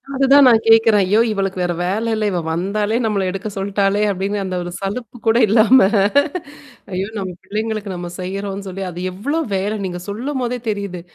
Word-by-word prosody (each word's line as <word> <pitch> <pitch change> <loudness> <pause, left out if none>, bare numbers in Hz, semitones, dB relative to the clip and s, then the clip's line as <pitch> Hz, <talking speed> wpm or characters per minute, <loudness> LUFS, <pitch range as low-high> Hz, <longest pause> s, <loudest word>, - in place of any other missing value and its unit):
அதுதான் 275 +1 +6
நான் 225 -2 +5
கேட்கிறேன் 225 -2 +6
ஐயோ! 210 +4 +3
இவளுக்கு 195 -2 -2
வேறு 175 -1 0
வேலை 220 +5 -1
இல்ல, 215 -1 -1
இவள் 175 -3 -2
வந்தாலே 205 +6 -1
நம்மை 200 -3 0
எடுக்கச் 195 +2 -5
சொல்லிட்டாளே 200 +1 0
அப்படின்ற 195 +2 -2
அந்த 185 -1 -4
ஒரு 175 - -6
சலிப்பு 220 +4 -5
கூட 225 +1 +4
இல்லாம. 225 +4 +5 1.1
ஐயோ! 190 +2 -2
நம்முடைய 185 -3 -5
பிள்ளைகளுக்கு 215 -1 -3
நாம் 175 0 -7
செய்கிறோம் 195 +2 -4
என்று 200 0 -7
சொல்லி 190 +1 -5
அது 175 - -8
எவ்வளவு 280 - -2
வேலை 205 +3 -1
நீங்கள் 175 -1 -6
சொல்லும்பொழுதே 250 +2 -3
தெரிகிறது. 200 -4 -4
200 Hz, 170 wpm, -19 LUFS, 190-225 Hz, 1.1 s, அதுதான்